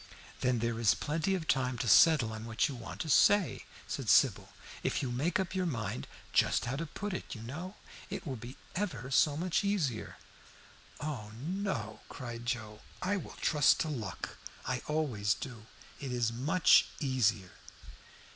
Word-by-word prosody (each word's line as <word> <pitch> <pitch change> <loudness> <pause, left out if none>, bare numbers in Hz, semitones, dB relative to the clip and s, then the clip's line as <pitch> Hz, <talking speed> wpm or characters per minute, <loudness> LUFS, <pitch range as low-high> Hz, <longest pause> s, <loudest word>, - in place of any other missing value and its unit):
"Then 125 -1 +2
there 115 0 -1
is 115 -4 +4
plenty 165 +6 0
of 165 -4 -4
time 130 -2 +1
to 125 - -2
settle 140 -3 +6
on 110 0 -6
what 115 +5 +1
you 145 - -5
want 115 -3 -7
to - - -4
say," 200 +5 +4 0.2
said - - -3
Sybil. - - +4 0.3
"If - - -1
you 125 - -2
make 145 +11 0
up 190 -1 -2
your 185 -1 0
mind 105 - -3 0.3
just - - +3
how 120 - -2
to 165 +2 -3
put 205 +6 -5
it, 185 - -5
you 110 - -8
know, 170 - -6 0.3
it - - -5
will 135 -4 -3
be 120 +2 -9 0.2
ever 135 - -3
so 145 +2 +4
much 180 +4 0
easier." 170 - -1 0.8
"Oh 130 -9 -4
no!" 145 - -3
cried 120 -2 -7
Joe. 110 -4 -3 0.2
"I 195 +2 +1
will 195 - -6
trust 150 -3 +4
to 160 - -1
luck. 115 -9 -5 0.3
I 125 -1 -1
always 125 -10 +1
do; 115 -5 -8 0.3
it 135 -3 -5
is 120 -2 0
much 150 +10 +5
easier." 110 - +1
130 Hz, 170 wpm, -32 LUFS, 115-160 Hz, 0.8 s, settle